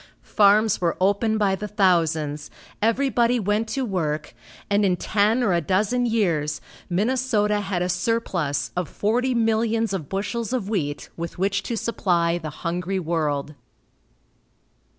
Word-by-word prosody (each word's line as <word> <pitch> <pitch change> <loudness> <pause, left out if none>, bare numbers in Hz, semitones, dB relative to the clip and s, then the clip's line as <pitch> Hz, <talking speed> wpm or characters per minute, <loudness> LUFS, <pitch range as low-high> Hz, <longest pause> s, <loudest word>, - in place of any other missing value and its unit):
Farms 210 0 +3
were 170 -2 0
opened 205 +4 +2
by 200 -2 +2
the 210 +2 -3
thousands, 160 -7 +1 0.3
everybody 240 +1 +2
went 210 +2 0
to 265 +3 -2
work, 155 -7 -2 0.3
and 205 +1 +2
in 185 -3 +3
ten 215 +6 +1
or 200 -6 +2
a 170 - +2
dozen 210 +9 +1
years, 165 -10 0 0.3
Minnesota 210 +1 +1
had 190 -3 -2
a - - 0
surplus 180 -6 -1
of 180 -2 -2
forty 245 +5 0
millions 225 -1 +1
of 160 -7 -4
bushels 210 +5 -3
of 235 -7 -1
wheat 155 -9 -3
with 170 0 -6
which 195 +2 0
to 230 +3 -4
supply 175 -7 0
the 155 -2 -5 0.2
hungry 180 +3 -1
world. 155 -4 -1
200 Hz, 140 wpm, -23 LUFS, 170-225 Hz, 0.3 s, Farms